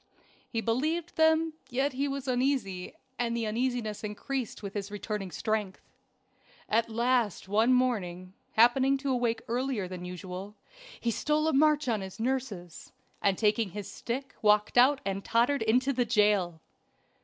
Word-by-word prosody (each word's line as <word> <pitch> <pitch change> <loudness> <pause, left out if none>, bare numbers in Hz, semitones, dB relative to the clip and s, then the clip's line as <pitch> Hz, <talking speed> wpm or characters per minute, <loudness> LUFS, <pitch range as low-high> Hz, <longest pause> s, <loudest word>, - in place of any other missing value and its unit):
He 225 - -2
believed 310 +10 -1
them, 320 0 +3 0.2
yet 270 +3 0
he 275 +2 -1
was 275 -1 -4
uneasy; 250 -8 -1 0.2
and 235 -1 0
this 230 - -1
uneasiness 225 -1 -2
increased 225 +3 -4
with 200 -1 -5
his 200 -1 -4
returning 205 -1 -4
strength. 210 -1 -2 0.9
At 230 +1 +1
last 235 -3 +1
one 220 +5 +3
morning, 190 -8 0 0.2
happening 260 +4 +5
to 270 0 -2
awake 235 -2 0
earlier 245 -4 -1
than 180 -1 -7
usual, 180 +3 -7 0.4
he 235 - 0
stole 300 +7 +1
a 320 - +2
march 300 0 +4
on 220 -4 +1
his 190 +1 -8
nurses, 225 -9 -3 0.3
and 195 -2 +2
taking 215 -1 +2
his 205 +1 -7
stick 265 +3 -5
walked 210 0 +3
out 260 +3 +5
and 195 0 -2
tottered 240 +4 +2
into 250 +5 +2
the 245 -1 +2
jail. 205 -7 +2
230 Hz, 150 wpm, -29 LUFS, 205-260 Hz, 0.9 s, happening